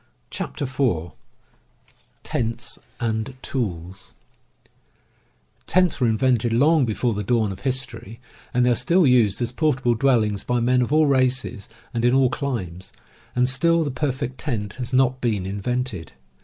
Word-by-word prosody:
CHAPTER -, -, -4 dB
IV 125 Hz, -, -1 dB, 1.1 s
TENTS 115 Hz, 0 st, -2 dB, 0.2 s
AND 110 Hz, +2 st, -2 dB
TOOLS 95 Hz, -7 st, -4 dB, 1.5 s
T^ENTS 180 Hz, -4 st, +2 dB
were 125 Hz, -, +4 dB
invented 120 Hz, +1 st, +2 dB
long 145 Hz, +5 st, +4 dB
before 115 Hz, +2 st, 0 dB
the 105 Hz, -, -3 dB
dawn 110 Hz, 0 st, +1 dB
of 95 Hz, -, -8 dB
his 130 Hz, -1 st, +1 dB
^ 130 Hz, -, -1 dB
tory, 115 Hz, -1 st, -11 dB, 0.3 s
and 125 Hz, 0 st, +2 dB
they 125 Hz, -, +4 dB
are -, -, +3 dB
still 175 Hz, +7 st, +3 dB
used 120 Hz, -4 st, +3 dB
as 120 Hz, -, -2 dB
portable 135 Hz, -4 st, +1 dB
dwellings 110 Hz, -5 st, +1 dB
by 125 Hz, 0 st, 0 dB
men 125 Hz, +2 st, +2 dB
of 125 Hz, -, -1 dB
all 155 Hz, +1 st, +4 dB
races 130 Hz, -6 st, 0 dB, 0.2 s
and 115 Hz, -1 st, -2 dB
in 120 Hz, +1 st, +4 dB
all 130 Hz, -2 st, +3 dB
climes 95 Hz, -, -4 dB, 0.2 s
— -, -, -30 dB
and 125 Hz, 0 st, +3 dB
still 165 Hz, +5 st, +2 dB
the 145 Hz, -, -2 dB
per 135 Hz, +3 st, -1 dB
fect 130 Hz, 0 st, -5 dB
tent 105 Hz, -8 st, -3 dB
has 125 Hz, 0 st, -4 dB
not 130 Hz, 0 st, +2 dB
been 105 Hz, -6 st, 0 dB
invented. 100 Hz, -2 st, -3 dB
125 Hz, 160 wpm, -23 LUFS, 110-130 Hz, 1.5 s, were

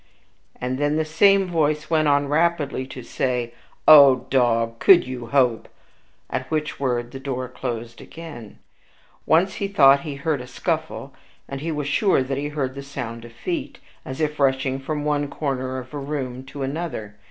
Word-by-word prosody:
And 125 Hz, +1 st, -3 dB
then 145 Hz, +1 st, +1 dB
the 160 Hz, 0 st, 0 dB
same 195 Hz, +5 st, +4 dB
voice 155 Hz, -3 st, 0 dB
went 155 Hz, -1 st, +3 dB
on 145 Hz, 0 st, +3 dB
rapidly 150 Hz, -3 st, 0 dB
to 130 Hz, -2 st, -9 dB
say, 120 Hz, -1 st, -2 dB, 0.3 s
"O 140 Hz, -4 st, +8 dB
dog! 115 Hz, -3 st, +2 dB
could 175 Hz, -2 st, +6 dB
you 125 Hz, -2 st, -6 dB
hope" 125 Hz, -3 st, +1 dB, 0.6 s
at 130 Hz, 0 st, -4 dB
which 155 Hz, -2 st, -2 dB
word 120 Hz, -3 st, -1 dB
the 135 Hz, -, -7 dB
door 130 Hz, -2 st, -4 dB
closed 120 Hz, -2 st, -6 dB
again. 150 Hz, -10 st, -10 dB, 0.7 s
Once 180 Hz, +4 st, +3 dB
he 200 Hz, -, -1 dB
thought 140 Hz, -9 st, +6 dB
that -, -, -12 dB
he 145 Hz, -3 st, -4 dB
heard 140 Hz, 0 st, -1 dB
a 125 Hz, -, -9 dB
scuffle, 155 Hz, 0 st, -3 dB, 0.3 s
and 140 Hz, 0 st, -6 dB
he 165 Hz, +2 st, -3 dB
was 150 Hz, -2 st, -3 dB
sure 170 Hz, -2 st, +2 dB
that 135 Hz, +1 st, -3 dB
he 145 Hz, -, -2 dB
heard 140 Hz, -3 st, -3 dB
the 140 Hz, -, -7 dB
sound 115 Hz, -4 st, -7 dB
of 120 Hz, -, -12 dB
feet, 330 Hz, -, -4 dB, 0.3 s
as 130 Hz, +2 st, -7 dB
if 150 Hz, -1 st, -1 dB
rushing 135 Hz, -1 st, +1 dB
from 150 Hz, +2 st, -4 dB
one 145 Hz, -1 st, 0 dB
corner 130 Hz, -3 st, -3 dB
of 130 Hz, +2 st, -9 dB
a 145 Hz, -, -4 dB
room 135 Hz, -3 st, -4 dB
to 135 Hz, +1 st, -7 dB
another. 135 Hz, -8 st, -4 dB
140 Hz, 180 wpm, -23 LUFS, 130-155 Hz, 0.7 s, O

